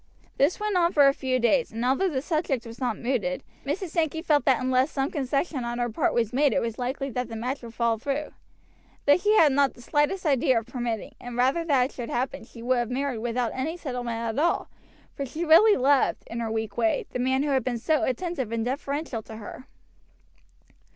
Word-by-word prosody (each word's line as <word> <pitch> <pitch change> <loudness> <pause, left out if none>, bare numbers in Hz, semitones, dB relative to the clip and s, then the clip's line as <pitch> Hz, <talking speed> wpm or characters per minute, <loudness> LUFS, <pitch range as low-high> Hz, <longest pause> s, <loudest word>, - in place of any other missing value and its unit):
This 285 +6 +2
went 420 -1 -1
on 345 -1 +3
for 285 -2 +6
a 275 - +5
few 260 -2 -1
days, 245 +1 +2
and 230 +2 -3
although 270 +10 +2
the 265 -5 -2
subject 300 -7 -1
was 230 0 -10
not 245 -5 -1
mooted, 225 -8 -1 0.2
Mrs. 345 +6 -3
Sankey 320 -1 -1
felt 295 -4 +2
that 265 -3 +4
unless 255 +2 +2
some 275 -1 -2
concession 275 0 -1
on 240 0 -3
her 240 -1 -1
part - - 0
was 230 -2 0
made 280 -1 +3
it - - +2
was 230 0 -4
likely 265 +2 -3
that 250 -1 -3
the 225 - -6
match 250 +5 -3
would 230 -1 -10
fall 230 -1 +1
through. 280 +4 -3 0.7
This 290 +5 +5
she 420 +1 +3
had 315 -8 +6
not 275 0 +2
the - - -14
slightest 295 +8 0
idea 265 -4 +3
of 225 - -2
permitting, 240 -3 -4
and 245 0 -7
rather 265 +7 +2
than 275 -6 +3
it 265 - -6
should 240 -2 -6
happen 250 -1 -2
she 230 -1 -12
would 250 0 +2
have 240 -1 -2
married 260 -1 -2
without 240 +1 -1
any 310 +6 -3
settlement 245 -7 -4
at 230 +5 -1
all, 345 - 0 0.4
for 280 - -4
she 310 +6 -4
really 405 +7 +7
loved, 275 +1 +2
in 230 - -6
her 225 -1 -2
weak 220 -2 -3
way, 225 -2 +1
the 250 - -3
man 260 +2 +1
who 295 - -1
had 265 -3 +2
been 245 -1 -1
so 305 +6 +1
attentive 265 - -2
and 230 0 -1
deferential 280 -1 -3
to 220 - -11
her. 220 +4 -9
260 Hz, 225 wpm, -26 LUFS, 235-290 Hz, 0.7 s, really